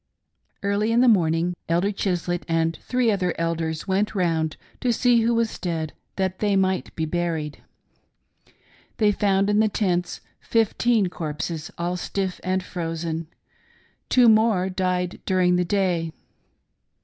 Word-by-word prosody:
Early 200 +2 +1
in 235 +1 +4
the 255 - +5
morning, 175 -4 +3 0.2
Elder 175 +5 +2
Chislett 180 -3 -1
and 165 -1 +1
three 250 -3 +1
other 185 -4 0
Elders 165 -1 -2
went 200 +3 0
round 165 -4 0 0.2
to 250 - +1
see 235 0 +3
who 230 +1 +2
was 230 -1 -1
dead, 160 -4 -3 0.2
that 190 -1 -1
they 205 -2 +1
might 190 -1 0
be 160 - -1
buried. 160 -2 -2 1.4
They 210 -2 +4
found 200 -1 +2
in 205 0 +3
the 215 0 +4
tents 180 -4 -1 0.2
fifteen 225 -1 +2
corpses— 155 0 -4
all 175 +1 -2
stiff 190 +1 -3
and 185 0 0
frozen. 165 -2 -4 0.8
Two 250 -2 +5
more 215 -4 +4
died 180 -1 -1
during 185 -2 +3
the 180 0 +1
day. 175 -4 0
185 Hz, 135 wpm, -24 LUFS, 165-205 Hz, 1.4 s, the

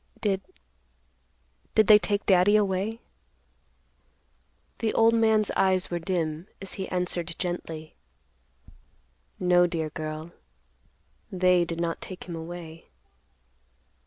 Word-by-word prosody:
Did—did 210 - -5
they 210 0 +8
take 205 -1 -1
Daddy 190 +2 +5
away?" 205 +2 0 1.8
The 225 -2 -1
old 225 0 +5
man's 220 -2 +3
eyes 185 -1 +1
were 175 - -1
dim 165 -1 -2
as 195 -1 -6
he 190 - -5
answered 175 -2 -2
gently, 165 -3 -5 1.5
"No, 180 -1 +4
dear 160 -3 -3
girl; 155 +1 -6 1.0
they 180 -2 +3
did 170 0 -5
not 170 -1 -2
take 185 - -7
him 175 -2 -7
away." 165 0 -8
180 Hz, 100 wpm, -27 LUFS, 170-200 Hz, 1.8 s, they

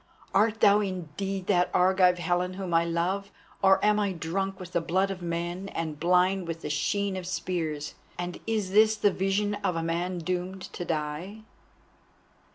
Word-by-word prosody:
"Art 215 +2 +2
thou 200 +1 +6
indeed 190 0 -3
that 180 -3 +2
Argive 180 0 +4
Helen 180 +1 0
whom 185 -3 -4
I 165 0 +5
love, 180 +4 -1 0.3
or 195 0 +6
am 210 0 +4
I 200 -2 0
drunk 190 +3 -3
with 180 -1 -8
the 170 - +1
blood 190 +4 +1
of 185 -1 -6
men 175 +3 -3
and 155 -3 -3
blind 180 +1 +2
with 165 0 -4
the 150 - -3
sheen 200 +6 0
of 185 -1 -5
spears, 160 -5 -3 0.2
and 175 0 -4
is 215 -4 -1
this 215 +2 +5
the 205 -1 +3
vision 195 +2 0
of 180 - +1
a 165 - -1
man 175 +2 -1
doomed 180 +2 -3
to - - -4
die?" 165 +6 -4
185 Hz, 170 wpm, -28 LUFS, 170-195 Hz, 0.3 s, thou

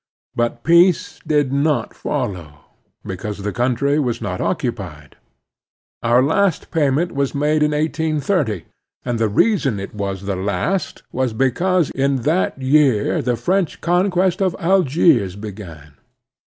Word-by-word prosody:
But 120 0 -1
peace 170 +2 +3
did 145 -3 +1
not 145 +1 0
follow, 85 -7 -4 0.5
because 100 +2 -5
the 105 - -3
cotintry 130 +4 +1
was 125 -5 -1
not 95 -5 -4
occupied. 95 - -4 0.9
Our 120 +2 +3
last 180 +4 +1
payment 155 +1 +1
was 140 0 -2
made 150 +2 +1
in 150 - +3
1830, 150 - -1 0.4
and 120 -2 -2
the 110 -1 +1
reason 135 - +1
it 100 - -7
was 100 -2 -4
the 100 -1 -2
last 100 - -2
was 130 -2 -1
because 155 +8 +1
in 135 -2 0
that 160 -1 0
year 135 0 +2
the 125 -2 0
French 180 - -1
conquest 180 +2 +1
of 185 -3 +1
Algiers 160 - +3
began. 95 -8 -9
135 Hz, 130 wpm, -19 LUFS, 105-160 Hz, 0.9 s, peace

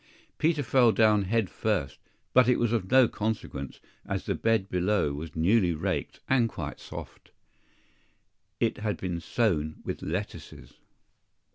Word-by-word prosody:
Peter 155 -2 +2
fell 120 -1 +4
down 105 -3 +3
head 110 +1 +1
first; 90 - -2 0.3
but 130 -1 +6
it 125 - +4
was 120 -1 +1
of 105 -6 -1
no 130 -1 +6
consequence, 105 - -4 0.2
as - - -4
the - - 0
bed 110 -4 +1
below 90 -4 +1
was 75 +2 -7
newly 90 +1 +3
raked 95 +4 -3
and 125 -3 +3
quite - - -6
soft. - - -10 1.3
IT - - 0
had 105 -1 -2
been 90 -2 -3
sown 80 -6 0
with - - -4
lettuces. 95 +6 -6
105 Hz, 140 wpm, -28 LUFS, 90-115 Hz, 1.3 s, but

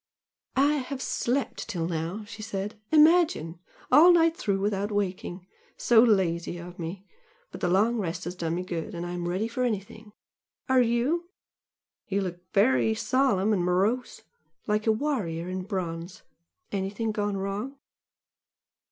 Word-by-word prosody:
"I 285 +3 +3
have 270 0 -4
slept 265 +1 -2
till 165 -2 -2
now," 170 +5 -3
she 205 +1 -10
said 205 0 -4 0.2
"Imagine! 310 - +4 0.3
all 310 +7 +8
night 330 -1 +4
through 200 -10 -1
without 205 +1 -1
waking! 185 -2 -3 0.3
So 230 -2 +5
lazy 180 -7 +2
of 175 +1 -10
me! 175 +4 -6 0.5
but - - -9
the - - +1
long 210 +7 +3
rest 170 -5 -3
has 175 - -4
done 170 -2 -2
me 180 - -2
good 170 -2 -5
and 170 +1 -4
I'm 175 0 -4
ready 190 +5 -1
for 235 +2 -4
anything! 215 -1 -4 0.6
Are 260 -1 +4
you? 250 +9 0 0.8
You 200 -1 0
look 180 -2 -4
very 220 +1 +3
solemn 220 -2 +2
and 185 -4 +1
morose! 200 +8 0 0.4
like 210 +1 0
a - - +6
warrior 215 - -2
in 185 0 -4
bronze! 175 -3 -5 0.5
Anything 200 +3 -2
gone 205 -1 -1
wrong?" 200 +8 -4
205 Hz, 145 wpm, -27 LUFS, 180-240 Hz, 0.8 s, all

